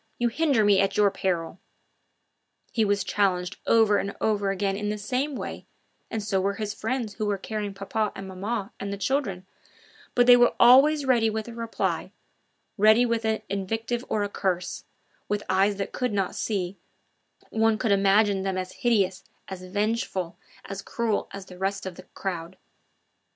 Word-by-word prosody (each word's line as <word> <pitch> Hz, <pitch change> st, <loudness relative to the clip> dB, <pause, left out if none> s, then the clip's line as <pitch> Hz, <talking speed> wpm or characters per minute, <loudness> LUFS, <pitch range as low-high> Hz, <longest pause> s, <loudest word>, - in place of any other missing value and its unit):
You 240 Hz, 0 st, +1 dB
hinder 270 Hz, -4 st, +2 dB
me 200 Hz, -2 st, +5 dB
at 195 Hz, -, 0 dB
your 205 Hz, -1 st, +4 dB
peril." 180 Hz, -3 st, -2 dB, 1.1 s
He 225 Hz, -, +2 dB
was 205 Hz, -1 st, +1 dB
challenged 185 Hz, -3 st, 0 dB
over 220 Hz, -3 st, +5 dB
and 200 Hz, -, -4 dB
over 205 Hz, -2 st, +1 dB
again 195 Hz, 0 st, 0 dB
in 210 Hz, +1 st, -2 dB
the 210 Hz, -, -2 dB
same 255 Hz, +7 st, -2 dB
way, -, -, -6 dB, 0.4 s
and 220 Hz, -2 st, -3 dB
so 195 Hz, -2 st, 0 dB
were 200 Hz, +1 st, 0 dB
his 210 Hz, 0 st, -3 dB
friends 225 Hz, 0 st, -3 dB
who 215 Hz, -1 st, -3 dB
were 205 Hz, -1 st, 0 dB
carrying 205 Hz, 0 st, -4 dB
papa 205 Hz, +2 st, -2 dB
and 195 Hz, -, -7 dB
maman 200 Hz, +3 st, -4 dB
and 200 Hz, -, -4 dB
the 200 Hz, -, -3 dB
children; 200 Hz, -4 st, -1 dB, 0.7 s
but 245 Hz, -, +5 dB
they 245 Hz, 0 st, +9 dB
were 240 Hz, 0 st, +4 dB
always 275 Hz, +5 st, +7 dB
ready 235 Hz, -4 st, +3 dB
with 220 Hz, +1 st, -3 dB
a 235 Hz, -, -8 dB
reply, 230 Hz, -1 st, -2 dB, 0.7 s
ready 220 Hz, +4 st, +6 dB
with 230 Hz, -1 st, -1 dB
an 220 Hz, 0 st, 0 dB
invective 225 Hz, +5 st, -2 dB
or 210 Hz, -, 0 dB
a -, -, 0 dB
curse; 180 Hz, -3 st, -2 dB, 0.4 s
with 210 Hz, 0 st, -1 dB
eyes 195 Hz, +2 st, +3 dB
that 195 Hz, 0 st, -4 dB
could 250 Hz, -4 st, -1 dB
not 195 Hz, -2 st, 0 dB
see, 195 Hz, -3 st, -3 dB, 0.7 s
one 225 Hz, 0 st, +2 dB
could 220 Hz, -, 0 dB
imagine 200 Hz, 0 st, +4 dB
them 190 Hz, -1 st, -2 dB
as 185 Hz, 0 st, -4 dB
hideous, 200 Hz, -6 st, +2 dB, 0.3 s
as 190 Hz, -1 st, -7 dB
vengeful, 205 Hz, -2 st, -2 dB, 0.3 s
as 195 Hz, 0 st, -6 dB
cruel 225 Hz, +1 st, -1 dB
as 200 Hz, -1 st, -8 dB
the 180 Hz, -1 st, -13 dB
rest 195 Hz, +1 st, -2 dB
of 190 Hz, -, -4 dB
the 185 Hz, -, -12 dB
crowd. 180 Hz, -1 st, -4 dB
205 Hz, 175 wpm, -26 LUFS, 195-225 Hz, 1.1 s, they